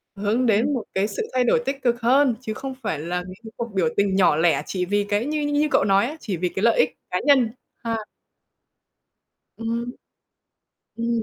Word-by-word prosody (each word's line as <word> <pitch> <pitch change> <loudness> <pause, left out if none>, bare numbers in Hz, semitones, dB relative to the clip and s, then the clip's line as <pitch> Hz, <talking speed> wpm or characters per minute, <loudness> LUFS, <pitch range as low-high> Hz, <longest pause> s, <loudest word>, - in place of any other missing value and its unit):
hướng 210 +5 0
đến 230 +5 +3
một 245 -5 -2
cái 195 +2 +1
sự 205 - -4
thay 255 -1 +3
đổi 240 - +3
tích 270 0 -3
cực 240 -1 +1
hơn, 255 +1 +4
chứ 220 -4 -4
không 265 +3 -6
phải 160 -9 -2
là 175 +3 -3
mấy 185 - -8
cái 220 - -9
cuộc 235 -2 -5
biểu 185 -4 +2
tình 200 -1 +2
nhỏ 185 -5 +4
lẻ 165 +2 +2
chỉ 180 -2 -2
vì 205 +2 0
cái 205 +3 +1
như 300 +1 -1
như 290 +1 +1
cậu - - +4
nói 195 +1 +3
á, 300 - -6
chỉ 195 - -4
vì 180 +1 -1
cái 190 - -4
lợi 230 0 +4
ích 155 - +2
cá 180 - +1
nhân, 260 -6 +5 0.3
ha. 230 -1 -1 1.6
Ừm. 230 +1 -3 1.1
Ừm. 230 0 -1
225 Hz, 210 wpm, -23 LUFS, 195-250 Hz, 1.6 s, nhân